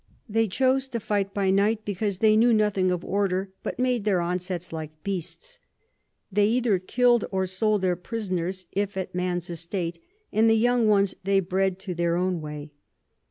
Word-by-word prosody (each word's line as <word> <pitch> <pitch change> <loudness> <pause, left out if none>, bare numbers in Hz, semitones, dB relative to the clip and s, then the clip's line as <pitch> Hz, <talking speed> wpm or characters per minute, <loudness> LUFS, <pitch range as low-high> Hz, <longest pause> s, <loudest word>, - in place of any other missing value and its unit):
They 225 +1 +1
chose 260 +6 +1
to 240 -3 -3
fight 200 -2 -1
by 195 -1 +1
night, 210 +3 +2
because 200 -1 -2
they 215 +1 +4
knew 235 +2 +5
nothing 205 -3 +2
of 180 -1 -2
Order, 195 -1 0
but - - -4
made 250 -3 +1
their 200 -3 +2
Onsets 180 0 -3
like 155 -1 -7
Beasts. 200 - -5 0.7
They 205 +1 +3
either 230 -4 +2
kill'd 240 +4 +2
or 190 -1 0
sold 200 +2 0
their 180 -1 +2
Prisoners, 185 -2 -4
if 200 -1 -2
at 190 - -4
Man's 180 -1 -2
Estate, 170 - -4 0.3
and 220 +1 +4
the 225 - +5
young 240 0 +3
ones 200 -2 +3
they 195 +1 +3
bred 190 0 -1
in 180 - -2
their 170 -1 +1
own 180 -1 0
way. 150 -1 -7
195 Hz, 175 wpm, -26 LUFS, 180-215 Hz, 0.7 s, knew